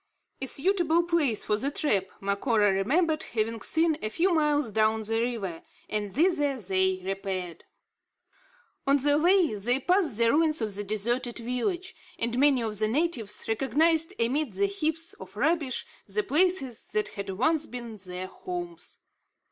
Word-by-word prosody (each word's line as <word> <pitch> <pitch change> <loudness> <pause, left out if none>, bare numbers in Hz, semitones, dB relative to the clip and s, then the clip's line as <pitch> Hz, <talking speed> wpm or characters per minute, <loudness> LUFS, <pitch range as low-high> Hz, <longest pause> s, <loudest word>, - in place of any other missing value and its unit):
A 265 - -1
suitable 345 +2 +2
place 315 -11 +1
for 210 - +1
the 270 +6 0
trap, 210 - 0
Macora 205 +1 +1
remembered 310 - +1
having 225 -3 -2
seen, 320 +3 +1
a 215 - -2
few 350 - +1
miles 300 -6 +1
down 220 +1 +2
the 225 +1 0
river; 210 -9 -3 0.3
and 205 -2 -3
thither 295 -4 +2
they 190 -2 0
repaired. 190 -3 -4 1.2
On 280 +1 +5
the 290 +2 +3
way, 355 - +4
they 240 +6 +2
passed 345 - +1
the 230 0 +4
ruins 310 +1 +2
of 215 -3 -2
the 205 +1 -3
deserted 235 +4 -1
village, 250 - -2 0.2
and 235 +1 0
many 275 -3 +4
of 215 -2 -2
the 215 - +2
natives 250 -4 -1
recognised 320 - +2
amid 255 +1 0
the 200 +2 +1
heaps 315 - -2
of - - -12
rubbish 315 -6 0 0.2
the 210 +1 -1
places 295 - +1
that 215 - +1
had 200 -1 -6
once 300 - +1
been 235 -3 -7
their 185 -1 -6
homes. 350 - -7
245 Hz, 155 wpm, -27 LUFS, 210-315 Hz, 1.2 s, On